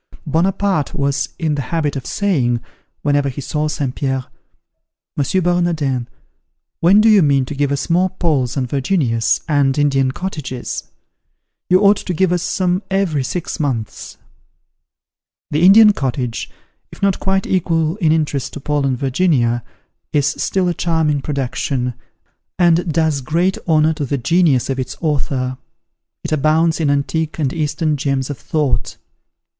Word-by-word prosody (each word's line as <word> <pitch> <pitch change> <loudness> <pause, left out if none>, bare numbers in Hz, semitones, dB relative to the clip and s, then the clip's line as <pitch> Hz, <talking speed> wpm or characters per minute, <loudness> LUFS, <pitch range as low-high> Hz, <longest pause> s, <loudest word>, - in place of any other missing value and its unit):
Buonaparte 180 +1 0
was 140 -1 0
in 155 -2 -1
the 145 - -1
habit 150 0 -2
of 135 - -5
saying, 135 - 0 0.4
whenever 145 -1 +1
he 130 - -7
saw 150 +2 -2
St. 140 -4 -2
Pierre, 135 -2 -2 0.9
"M. 160 +6 0
Bernardin, 165 -8 0 0.7
when 195 +5 +5
do 220 - +4
you 210 -3 +6
mean 140 -4 +3
to 140 - -6
give 140 0 0
us 140 0 -2
more 180 +2 +2
Pauls 145 -9 -1
and 130 -2 -1
Virginias, 130 - 0
and 145 -3 +2
Indian 135 -3 +2
Cottages? 140 -7 -5 0.8
You 185 +1 +5
ought 205 0 +5
to 180 - -4
give 185 +2 +2
us 180 -1 +1
some 180 +1 0
every 190 -8 0
six 170 +6 -4
months." 125 -8 -3 1.3
The 150 - +1
"Indian 210 +3 +8
Cottage," 125 - -3 0.4
if - - -12
not 195 -2 +2
quite 190 0 0
equal 165 -2 0
in 165 -7 +2
interest 150 -4 -1
to - - -6
"Paul 145 0 0
and 130 -2 0
Virginia," 130 -4 +1 0.5
is 145 -2 +2
still 180 +6 0
a 175 - +1
charming 160 -4 0
production, 130 -2 -2 0.6
and 170 -1 +3
does 155 -3 +1
great 170 +8 0
honour 155 -1 +3
to 150 -2 -3
the 140 - -1
genius 140 0 +2
of 135 -1 -2
its 130 - -4
author. 130 -5 -1 0.6
It - - -5
abounds 155 +2 +2
in 155 -3 +1
antique 150 +3 -1
and 140 -5 -1
Eastern 155 -1 -1
gems 135 -1 -1
of 135 - -7
thought. 150 -4 -1
150 Hz, 150 wpm, -18 LUFS, 135-175 Hz, 1.3 s, Indian